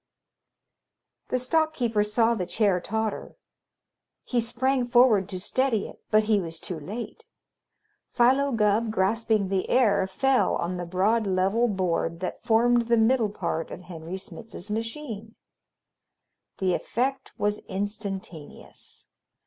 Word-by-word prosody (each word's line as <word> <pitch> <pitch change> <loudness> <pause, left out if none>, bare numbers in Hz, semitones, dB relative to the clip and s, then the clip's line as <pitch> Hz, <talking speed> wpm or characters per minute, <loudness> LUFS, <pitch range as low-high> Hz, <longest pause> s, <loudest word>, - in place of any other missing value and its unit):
The 255 - 0
stock 315 +5 +1
keeper 225 -4 +1
saw 225 +2 +2
the 185 -6 -3
chair 195 -1 +2
totter. 220 +3 -3 0.9
He 245 -2 0
sprang 245 +2 0
forward 240 -6 +4
to 185 - -4
steady 230 +2 0
it, - - -14
but 215 0 +4
he 210 -2 +2
was 165 -2 -5
too 175 -4 -5
late. 225 - -7 0.8
Philo 265 +4 +3
Gubb, 220 0 +2
grasping 215 0 +1
the 190 -1 -1
air, 205 -6 +3
fell 265 +7 +2
on 180 +1 -2
the 175 -1 -5
broad, 205 +5 +1
level 195 +5 +2
board 175 -4 -1
that 185 - -4
formed 235 0 +3
the 235 0 +3
middle 225 0 +3
part 170 -5 -3
of - - -8
Henry 175 0 -7
Smitz's 205 0 -9
machine. 225 -1 -5 1.2
The 185 -2 +1
effect 265 +8 -2
was 210 0 0
instantaneous. 195 -5 -7
215 Hz, 130 wpm, -26 LUFS, 190-235 Hz, 1.2 s, forward